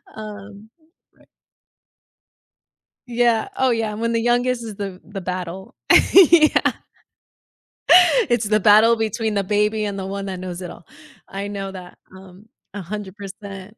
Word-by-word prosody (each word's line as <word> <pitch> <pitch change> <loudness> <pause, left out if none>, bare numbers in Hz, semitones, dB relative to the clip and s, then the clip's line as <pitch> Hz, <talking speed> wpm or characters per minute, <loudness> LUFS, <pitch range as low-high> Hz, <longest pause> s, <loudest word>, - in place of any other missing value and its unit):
Um, 210 0 -10 0.5
right - - -25 1.8
Yeah, 235 -2 +1
oh 260 -1 +1
yeah, 225 -3 -1
when 230 +2 -2
the 230 - +1
youngest 240 0 0
is 215 -3 -8
the 195 -3 -6
the 200 -2 -8
battle, 180 +1 -6 0.4
yeah. 340 -4 +5 1.6
It's 240 -2 +1
the 215 +1 +2
battle 215 +3 +5
between 220 0 -2
the 200 -1 0
baby 210 +2 0
and 200 -1 -4
the 190 - -5
one 195 0 -5
that 185 -2 -6
knows 180 -1 -7
it 175 - -7
all. 170 - -15 0.4
I 200 +1 -6
know 195 -1 -6
that, 180 -2 -11 0.2
um, 190 +3 -16 0.3
100%, 200 +1 -9
205 Hz, 135 wpm, -20 LUFS, 195-225 Hz, 1.8 s, yeah